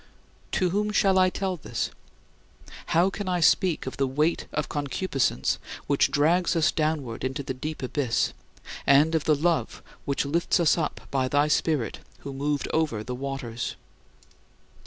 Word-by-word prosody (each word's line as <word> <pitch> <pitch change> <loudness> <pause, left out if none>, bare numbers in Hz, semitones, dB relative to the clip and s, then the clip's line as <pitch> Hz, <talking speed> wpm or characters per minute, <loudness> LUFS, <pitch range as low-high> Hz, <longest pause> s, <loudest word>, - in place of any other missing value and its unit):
To 180 -3 +1
whom 210 +2 0
shall 195 -2 +3
I 185 0 +5
tell 190 -1 -2
this? 150 - -3 1.0
How 175 +4 +3
can 200 -1 -4
I 180 -1 +1
speak 170 0 +3
of 130 - -6
the 135 - +1
weight 150 +6 0
of 150 -1 -2
concupiscence 140 - -1 0.3
which 140 0 +3
drags 160 +6 +2
us 165 -2 +3
downward 150 -7 -2
into 135 +2 -2
the 130 - -3
deep 150 +3 -5
abyss, 130 -2 0 0.5
and 145 +4 +5
of 160 -2 0
the 155 - +4
love 165 +3 0 0.2
which 140 0 0
lifts 170 +5 +1
us 165 -4 +4
up 165 - -2
by 130 -2 +1
thy 145 +3 +2
Spirit 150 -5 0 0.2
who 140 - -6
moved 145 +1 -1
over 150 -10 0
the 125 - -5
waters? 125 -3 -4
150 Hz, 155 wpm, -26 LUFS, 135-170 Hz, 1.0 s, I